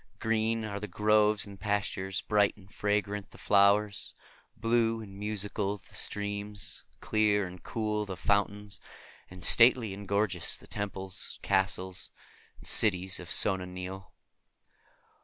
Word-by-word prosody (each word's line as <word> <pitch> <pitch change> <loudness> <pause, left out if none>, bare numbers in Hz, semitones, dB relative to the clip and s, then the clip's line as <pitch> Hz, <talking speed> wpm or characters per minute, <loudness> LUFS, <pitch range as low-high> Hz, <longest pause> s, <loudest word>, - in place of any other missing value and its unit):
Green 110 0 0
are 100 -1 -4
the 105 - -5
groves 105 +2 +2
and 100 -1 -11
pastures, 95 -2 -1
bright 105 -1 +2
and 100 0 -18
fragrant 105 -1 -1
the - - -16
flowers, 100 +1 +3 0.4
blue 115 0 +1
and 100 -3 -10
musical 105 -1 -2
the - - -23
streams, 105 0 -2 0.2
clear 105 -2 +2
and 90 -1 -10
cool 105 0 -2
the 95 -2 -6
fountains, 100 +4 0 0.5
and 90 0 -10
stately 115 -1 +6
and 100 +1 -9
gorgeous 100 -4 +1
the - - -16
temples, 95 -2 -3
castles, 95 -2 0 0.5
and - - -16
cities 95 -3 +3
of 90 - -9
Sona 95 -1 +3
Nyl. 90 0 -7
100 Hz, 130 wpm, -30 LUFS, 95-105 Hz, 0.5 s, stately